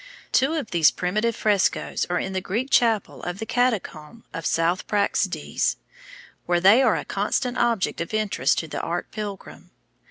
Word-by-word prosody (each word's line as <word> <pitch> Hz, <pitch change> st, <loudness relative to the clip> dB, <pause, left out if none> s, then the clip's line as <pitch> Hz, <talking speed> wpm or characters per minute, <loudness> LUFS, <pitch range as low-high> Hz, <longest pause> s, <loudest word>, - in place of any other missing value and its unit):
Two 275 Hz, +5 st, +2 dB
of 290 Hz, -9 st, -4 dB
these 165 Hz, -3 st, +5 dB
primitive 215 Hz, +6 st, -1 dB
frescos 205 Hz, -3 st, 0 dB
are 180 Hz, -, 0 dB
in 190 Hz, -, -3 dB
the 185 Hz, -, -1 dB
Greek 230 Hz, +9 st, -3 dB
chapel 225 Hz, -4 st, +2 dB
of 175 Hz, +1 st, -4 dB
the 220 Hz, -, -5 dB
Catacomb 225 Hz, -6 st, -2 dB
of 165 Hz, -, -6 dB
S. 165 Hz, +2 st, +1 dB
Praxedes, 205 Hz, -1 st, 0 dB, 0.7 s
where 175 Hz, 0 st, +2 dB
they 200 Hz, +8 st, +6 dB
are 250 Hz, -5 st, +3 dB
a -, -, -4 dB
constant 245 Hz, +5 st, -1 dB
object 230 Hz, -8 st, 0 dB
of 170 Hz, -, -5 dB
interest 210 Hz, -, +1 dB
to 160 Hz, -, -2 dB
the -, -, -4 dB
art 175 Hz, +1 st, -4 dB
pilgrim. 205 Hz, -2 st, -7 dB
205 Hz, 165 wpm, -24 LUFS, 175-230 Hz, 0.7 s, they